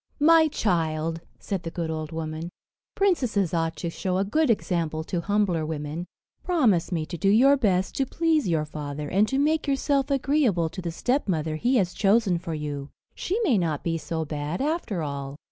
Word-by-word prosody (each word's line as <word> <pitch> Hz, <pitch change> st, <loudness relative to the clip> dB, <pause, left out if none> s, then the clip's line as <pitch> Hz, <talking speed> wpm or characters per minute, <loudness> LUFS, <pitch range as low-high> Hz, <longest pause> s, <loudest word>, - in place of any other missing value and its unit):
"My 320 Hz, +1 st, +6 dB
child," 165 Hz, -, -1 dB, 0.2 s
said 195 Hz, -4 st, -4 dB
the 165 Hz, -, -5 dB
good 165 Hz, -1 st, -3 dB
old 155 Hz, 0 st, -4 dB
woman, 160 Hz, +1 st, -4 dB, 0.5 s
"princesses 250 Hz, -, +1 dB
ought 165 Hz, -1 st, 0 dB
to 170 Hz, -, -4 dB
show 185 Hz, +2 st, -2 dB
a 195 Hz, -, +2 dB
good 305 Hz, +8 st, +1 dB
example 165 Hz, -7 st, 0 dB
to 170 Hz, +1 st, -3 dB
humbler 200 Hz, -4 st, +1 dB
women. 155 Hz, +2 st, -4 dB, 0.4 s
Promise 225 Hz, -, +2 dB
me 165 Hz, -3 st, -1 dB
to 170 Hz, 0 st, -7 dB
do 195 Hz, -, +2 dB
your 260 Hz, +7 st, +6 dB
best 190 Hz, -8 st, +1 dB
to 270 Hz, -, +1 dB
please 320 Hz, -, +1 dB
your 160 Hz, -3 st, +1 dB
father, 150 Hz, -1 st, -5 dB
and 205 Hz, +3 st, +3 dB
to 270 Hz, -, -1 dB
make 305 Hz, +2 st, +1 dB
yourself 275 Hz, 0 st, +1 dB
agreeable 270 Hz, -, +2 dB
to 165 Hz, +3 st, -7 dB
the 175 Hz, -, -3 dB
stepmother 165 Hz, -, -1 dB
he 245 Hz, +10 st, +1 dB
has 185 Hz, -7 st, +2 dB
chosen 200 Hz, -3 st, +2 dB
for 170 Hz, -2 st, -5 dB
you. 145 Hz, -2 st, -5 dB, 0.2 s
She 390 Hz, +6 st, -2 dB
may 260 Hz, -, +3 dB
not 160 Hz, -5 st, -1 dB
be 165 Hz, -1 st, 0 dB
so 160 Hz, +1 st, -3 dB
bad 150 Hz, +2 st, -4 dB
after, 275 Hz, -, -1 dB
all." 140 Hz, -1 st, -5 dB
180 Hz, 185 wpm, -25 LUFS, 160-255 Hz, 0.5 s, My